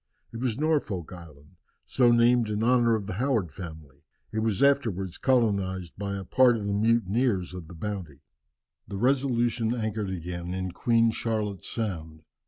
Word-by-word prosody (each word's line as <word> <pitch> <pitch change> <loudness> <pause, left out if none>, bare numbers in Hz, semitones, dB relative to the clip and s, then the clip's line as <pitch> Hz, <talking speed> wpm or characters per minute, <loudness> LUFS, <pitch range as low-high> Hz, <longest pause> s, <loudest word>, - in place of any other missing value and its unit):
It - - -5
was 120 -2 -1
Norfolk 140 - -1
Island, 80 -1 -14 0.3
so 125 -2 +3
named 120 -1 +4
in 105 +1 -1
honour 120 -1 +4
of 105 -3 -3
the 105 - -4
Howard 115 - 0
family. 80 -6 -10 0.3
It 110 - 0
was 110 +2 0
afterwards 110 -11 +1
colonized 100 -8 +1
by 100 0 -4
a 95 - -5
part 125 +5 +4
of 105 - -5
the 100 - -1
mutineers 110 -2 +1
of 90 -3 -8
the 85 - -11
Bounty. 90 -5 -6 0.7
The 100 - -5
Resolution 120 -2 +1
anchored 110 -3 -2
again 90 0 -5
in 95 -1 -3
Queen 115 +3 +2
Charlotte's 105 -4 -3
Sound. 80 -8 -4
105 Hz, 160 wpm, -27 LUFS, 90-120 Hz, 0.7 s, named